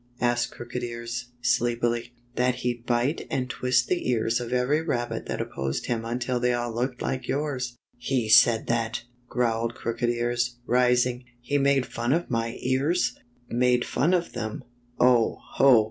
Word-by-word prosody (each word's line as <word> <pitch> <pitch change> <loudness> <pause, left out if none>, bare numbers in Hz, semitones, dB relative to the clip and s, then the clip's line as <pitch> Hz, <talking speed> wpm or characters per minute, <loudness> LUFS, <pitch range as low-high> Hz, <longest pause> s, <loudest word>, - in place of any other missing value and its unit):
" 120 - -34
asked 120 0 +1
Crooked 120 +1 -6
Ears, 120 0 -5 0.2
sleepily, 120 0 +1 0.2
"That 125 0 +2
he'd 120 -1 -2
bite 120 +5 0
and 130 -2 -1
twist 125 -1 +1
the 180 -7 -1
ears 115 -1 +1
of 120 -1 -5
every* 125 +5 +2
rabbit 120 -7 -2
that - - -3
opposed 65 0 -3
him 115 -2 -2
until 120 +1 -1
they 125 0 +2
all 120 -1 -2
looked 125 +2 -2
like 130 -1 -2
yours." 130 -4 -2
" - - -40
He 125 -5 +1
said 110 +1 +6
that! 115 0 -1
" 125 0 -37
growled 115 -1 0
Crooked 120 +1 -2
Ears, 120 +1 0
rising. 125 0 +2
" 120 - -36
He 140 +4 0
made 140 -2 +3
fun 120 +3 -1
of 170 -3 -1
my 115 0 -1
ears! 135 +8 +1 0.2
" 120 0 -35
"Made 125 0 +2
fun 170 +7 +2
of 175 -1 -2
them! 110 -3 -4 0.4
Oh! 120 -2 +4 0.2
Ho! 135 -4 +7
120 Hz, 175 wpm, -26 LUFS, 120-125 Hz, 0.4 s, Ho